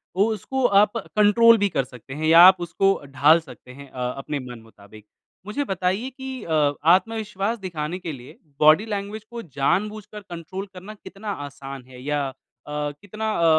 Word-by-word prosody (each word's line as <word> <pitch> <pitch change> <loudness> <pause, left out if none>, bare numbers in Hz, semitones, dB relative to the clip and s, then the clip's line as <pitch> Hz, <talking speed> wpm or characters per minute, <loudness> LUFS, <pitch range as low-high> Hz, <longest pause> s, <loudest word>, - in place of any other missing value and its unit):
वो 195 +2 +4
उसको 260 +5 -2
आप 210 0 +4
कंट्रोल 225 +2 +4
भी 205 -1 +1
कर 135 -6 0
सकते 125 +1 -12
हैं 155 +3 -3
या 165 +1 +7
आप 190 -1 +6
उसको 195 +3 +1
ढाल 140 +4 +4
सकते 145 -5 -14
हैं 140 +1 -12
अ, 125 -1 -3
अपने 140 +1 -4
मन 125 -2 -9
मुताबिक। 105 -1 -17 0.4
मुझे 210 +8 -2
बताइए 195 +2 -1
कि 265 -2 -8
अ 150 -3 +1 0.2
आत्मविश्वास 215 +1 -2
दिखाने 175 -2 -4
के 170 -3 -5
लिए 130 -3 -11 0.2
बॉडी 155 +7 +6
लैंग्वेज 205 0 -5
को 235 - -6
जानबूझकर 210 - -2
कंट्रोल 185 +1 -7
करना 190 +4 -10
कितना 205 0 -8 0.2
आसान 135 -1 -9
है 125 -1 -13
या 145 0 -1
अ, 135 - -7 0.7
कितना 215 +2 -4
अ 170 - +1
185 Hz, 170 wpm, -23 LUFS, 145-210 Hz, 0.7 s, या